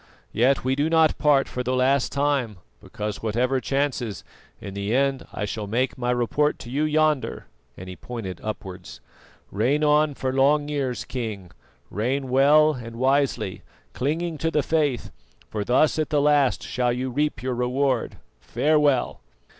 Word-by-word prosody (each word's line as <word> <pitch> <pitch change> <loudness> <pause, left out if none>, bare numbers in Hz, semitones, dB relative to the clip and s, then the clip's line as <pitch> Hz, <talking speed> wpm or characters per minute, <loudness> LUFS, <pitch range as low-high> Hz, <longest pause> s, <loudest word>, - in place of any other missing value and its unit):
Yet 130 +4 +2
we 130 +1 +1
do 145 +3 0
not 160 -1 +3
part 145 -2 +3
for 125 - -4
the 125 +1 -1
last 130 +1 +2
time, 140 -7 0 0.2
because 105 -1 -5
whatever 125 +4 0
chances, 135 -5 -2 0.4
in 100 - -8
the 100 +3 -2
end 135 0 0
I 105 - -3
shall 105 0 -5
make 125 +5 0
my 125 -2 -3
report 125 +5 +1
to 120 - -9
you 145 +4 0
yonder" 155 -2 0 0.3
and 95 - -9
he 90 - -7
pointed 100 -5 -7
upwards. 95 -4 -7 0.5
"Reign 130 +9 +1
on 150 -1 +3
for 130 -1 -2
long 145 +2 +3
years, 135 -4 -2
King 105 -8 -5 0.4
reign 130 +6 -2
well 150 +4 +5
and 115 -3 -8
wisely, 130 -6 0 0.3
clinging 160 +4 -2
to 165 - 0
the 150 -3 +1
Faith, 145 -6 0 0.4
for 105 -1 -2
thus 140 +8 +2
at 155 - -1
the 150 - +2
last 145 -2 +2
shall 125 -1 0
you 125 +2 -3
reap 145 -4 -1
your 130 0 -1
reward. 125 +1 0 0.2
Farewell!" 145 - +1
130 Hz, 160 wpm, -24 LUFS, 120-145 Hz, 0.5 s, well